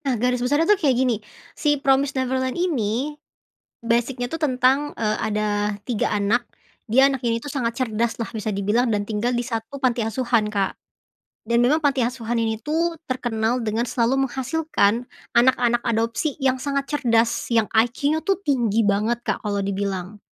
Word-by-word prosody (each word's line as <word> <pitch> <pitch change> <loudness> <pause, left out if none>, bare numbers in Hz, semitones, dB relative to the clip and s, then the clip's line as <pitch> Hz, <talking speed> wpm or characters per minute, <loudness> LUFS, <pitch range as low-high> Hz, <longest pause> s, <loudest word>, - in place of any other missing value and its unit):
Nah, 260 -3 +1
garis 250 +2 0
besarnya 290 +6 +2
tuh 420 +3 +4
kayak 270 -6 +3
gini. 250 -2 +2 0.4
Si 295 -1 +1
Promised 275 0 +2
Neverland 260 +1 -1
ini 280 - -1 0.7
basic-nya 240 +2 0
tuh 325 +6 -5
tentang, 270 0 +2
eee, 215 -1 0
ada 210 -1 -1
3 235 -4 0
anak. 210 +4 0 0.4
Dia 265 +5 +6
anak 270 -2 -3
ini 230 -1 0
tuh, 260 +5 -7
sangat 235 -4 -2
cerdaslah 230 -2 -1
bisa 215 -1 -3
dibilang 210 +5 +1
dan 205 -2 0
tinggal 220 +3 -1
di 240 - -2
satu 230 +2 -4
panti 255 -3 +1
asuhan, 225 -1 0
Kak. 200 -2 -1 0.7
Dan 235 +1 +2
memang 300 +6 +2
panti 280 -2 +2
asuhan 240 -2 -3
ini, 225 -1 0
tuh, 330 +4 0
terkenal 240 -3 -1
dengan 220 +2 0
selalu 250 +2 +1
menghasilkan 260 -4 0 0.3
anak-anak 240 -1 +3
adopsi 230 +6 -1
yang 265 -1 +2
sangat 275 +1 -2
cerdas, 235 -6 +1
yang 225 -2 +3
IQ-nya, 280 +8 +2
tuh, 390 -1 +1
tinggi 240 - +1
banget, 210 +4 +1
Kak, - - -1
kalau 205 -1 -1
dibilang. 195 0 -3
240 Hz, 160 wpm, -23 LUFS, 220-270 Hz, 0.7 s, Dia